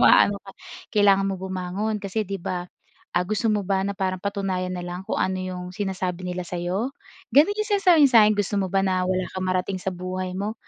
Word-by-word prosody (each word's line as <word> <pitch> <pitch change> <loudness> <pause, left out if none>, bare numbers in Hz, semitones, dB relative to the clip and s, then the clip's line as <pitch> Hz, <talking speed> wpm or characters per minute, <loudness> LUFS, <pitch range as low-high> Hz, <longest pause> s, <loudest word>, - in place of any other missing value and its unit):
maaano 200 0 +6
ka. 195 - -12 0.4
"Kailangan 200 -2 +5
mo 195 - -1
bumangon 190 +3 -2
kasi 205 +2 -1
'di 195 +1 -4
ba, 180 0 -2 0.5
ah, 175 +1 +2
gusto 215 +3 0
mo 210 -1 +1
ba 190 0 +1
na - - -1
parang 185 -1 -1
patunayan 195 -2 -2
na 180 - -4
lang 180 +1 -5
kung - - -1
ano 190 - +1
'yong 185 -1 -5
sinasabi 185 -3 -2
nila 180 0 -3
sa'yo?" 180 +9 -2 0.4
Gano'n 310 +9 +6
'yong 425 0 -2
sinasabi 370 -4 +5
niya 270 - -2
sa'kin. 210 0 +5
"Gusto 205 0 0
mo 190 - -1
ba 195 0 +3
na 185 -1 +1
wala 185 0 0
kang 185 - -3
marating 185 +1 -1
sa 190 - -1
buhay 185 +1 -4
mo? 205 +3 -2
190 Hz, 215 wpm, -24 LUFS, 185-205 Hz, 0.5 s, maaano